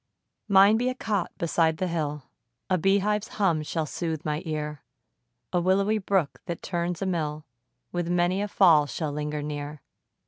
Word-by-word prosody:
Mine 200 +1 +6
be 245 +2 +1
a 255 - -3
cot 210 -7 -1
beside 165 -1 +1
the 185 - -1
hill, 150 -4 -2 0.5
A 185 - +3
bee 195 +4 +4
hive's 210 +2 0
hum 180 -7 +2
shall 155 +1 -2
sooth 160 0 -4
my 150 0 -1
ear; 150 -2 -3 0.7
A 175 - +2
willowy 195 +4 +2
brook, 190 -6 0
that 170 -2 -5
turns 175 0 -2
a - - -1
mill, 155 -4 -2 0.5
With 175 -1 -2
many 175 +2 +2
a 205 - -1
fall 165 -7 +5
shall 150 +1 -3
linger 150 0 -3
near. 145 -1 -5
170 Hz, 170 wpm, -26 LUFS, 150-195 Hz, 0.7 s, Mine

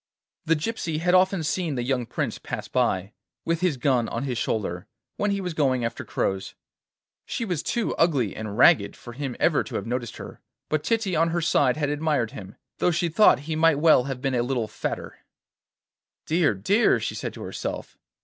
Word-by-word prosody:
The 165 - +3
gypsy 165 -2 -3
had 180 +2 +1
often 185 -1 +4
seen 165 -1 -1
the 120 - -2
young 125 -2 -1
Prince - - -3
pass - - -5
by, 95 +2 0 0.3
with 165 0 0
his 180 -7 +1
gun 125 -2 +1
on 115 - -3
his 130 -3 -2
shoulder, 95 -6 -2 0.3
when 205 - 0
he 200 0 0
was 180 -3 -3
going 130 -6 +1
after 115 - -4
crows. 95 0 -2 0.7
She 230 - -3
was 175 -7 -2
too 235 +4 -1
ugly 140 - +2
and 110 -1 -5
ragged 100 -5 +5
for 120 - -11
him 135 -1 -4
ever - - +3
to - - -8
have - - -2
noticed 120 -1 -3
her, - - -10 0.3
but 155 -1 0
Titty 225 -6 0
on 165 +1 +3
her 170 +1 0
side 145 -5 +2
had 145 -2 0
admired 145 -6 0
him, 95 -2 -10 0.2
though - - +3
she 170 0 0
thought 165 - +5
he 155 +2 -4
might 160 -1 +4
well 150 -5 +5
have 135 -2 -5
been 135 -1 -1
a 120 - +2
little 120 -2 -1
fatter. 105 +2 -5 1.1
'Dear, 160 - +2
dear!' 200 - +3
she - - -3
said - - -5
to - - -8
herself. - - -5
145 Hz, 195 wpm, -25 LUFS, 120-165 Hz, 1.1 s, ragged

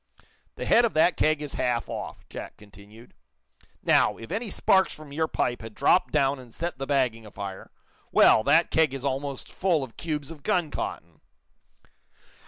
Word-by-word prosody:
"The - - -5
head 240 - +5
of 235 - 0
that 160 +1 +4
keg 155 -1 +1
is 145 - -6
half 120 -1 -1
off," - - -7
Jack - - -9
continued. 105 +3 -16 0.7
"Now, - - +3
if 115 - -10
any 220 +3 -3
sparks 190 0 +3
from 150 -2 -11
your 160 +2 0
pipe 120 -5 -1
had 110 -1 -9
dropped 175 +6 +3
down 135 0 +2
and 125 -2 -13
set 170 +1 -5
the 135 - -4
bagging 125 -5 +1
afire 100 -2 -8 0.4
well, 110 - +6
that 160 +4 +4
keg 155 -4 +2
is 135 0 -6
almost 140 0 -4
full 175 -6 +1
of 125 -4 -10
cubes 150 -3 -4
of 155 -3 -11
gun 165 0 0
cotton!" 80 -2 -6
140 Hz, 175 wpm, -26 LUFS, 115-160 Hz, 0.7 s, well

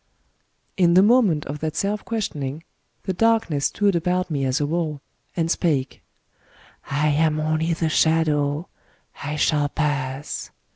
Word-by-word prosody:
* - - -45
In 170 0 +5
the 185 - +7
moment 210 - +3
of 150 +2 -5
that 155 0 -3
self 205 +1 -1
questioning, 155 - -4 0.4
the 190 - -2
Darkness 220 -8 +1
stood 200 -2 +1
about 180 +1 0
me 140 -3 0
as 130 +1 0
a 145 - +1
wall, 155 -1 -2 0.4
and 165 -1 0
spake: 145 -8 0 0.3
— - - -37
*^ - - -35 0.4
I 145 +2 +2
am 155 +1 +2
only 155 +2 0
the 165 0 -1
Shadow: 155 -1 +1 0.6
I 145 +1 -3
shall 150 -1 +1
pass. 140 -2 -3
155 Hz, 155 wpm, -23 LUFS, 145-175 Hz, 0.6 s, the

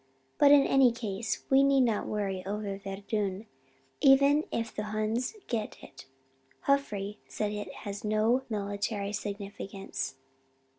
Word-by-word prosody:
But 285 - +7
in 285 -1 +7
any 270 -3 +5
case 225 -2 -3
we 270 0 +7
need 275 -1 +4
not 230 -4 +1
worry 195 -3 -2
over 200 +1 -3
Verdun, 200 +1 -3 0.6
even 280 +2 +6
if 230 -1 -2
the 210 - -3
Huns 215 - -1
get 220 -3 -3
it. - - -13 0.6
Joffre 210 -8 0
says 210 -1 -2
it 210 0 -5
has 200 0 -5
no 215 +4 +2
military 205 -1 -2
significance." 200 -6 -5
210 Hz, 130 wpm, -30 LUFS, 200-245 Hz, 0.6 s, But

